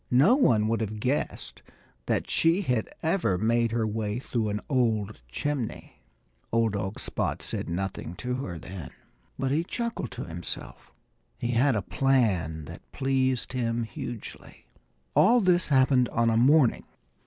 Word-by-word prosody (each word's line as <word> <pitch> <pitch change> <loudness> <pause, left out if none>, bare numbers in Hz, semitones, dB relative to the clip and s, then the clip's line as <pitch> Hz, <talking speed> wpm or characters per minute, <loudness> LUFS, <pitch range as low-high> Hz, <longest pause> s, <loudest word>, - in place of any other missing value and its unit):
No 140 - +5
one 115 - +4
would 115 +1 0
have 110 0 -3
guessed 130 +6 -2 0.5
that - - 0
she 165 +5 +2
had 125 - 0
ever 160 - +1
made 115 +2 +2
her 115 -1 0
way 105 0 -2
through 115 -4 -2
an 105 0 -1
old 110 - 0
chimney. 125 - -4 0.5
Old 115 -2 +2
dog 100 0 -3
Spot - - -2
said - - -3
nothing 90 -1 -4
to 125 +4 -3
her 95 -10 -5
then. 90 +2 -8 0.5
But 135 0 -1
he 155 +4 +2
chuckled 230 - -3
to - - -5
himself. 85 0 -7 0.5
He 120 - -2
had 125 +2 +3
a 105 - -1
plan 95 - +1
that - - -12
pleased 130 -1 0
him 120 -2 0
hugely. 120 -2 -8 0.5
All 245 +2 +6
this 180 -4 +3
happened 130 -3 +4
on 115 0 +2
a - - +2
morning. 130 +2 +4
120 Hz, 150 wpm, -27 LUFS, 105-135 Hz, 0.5 s, All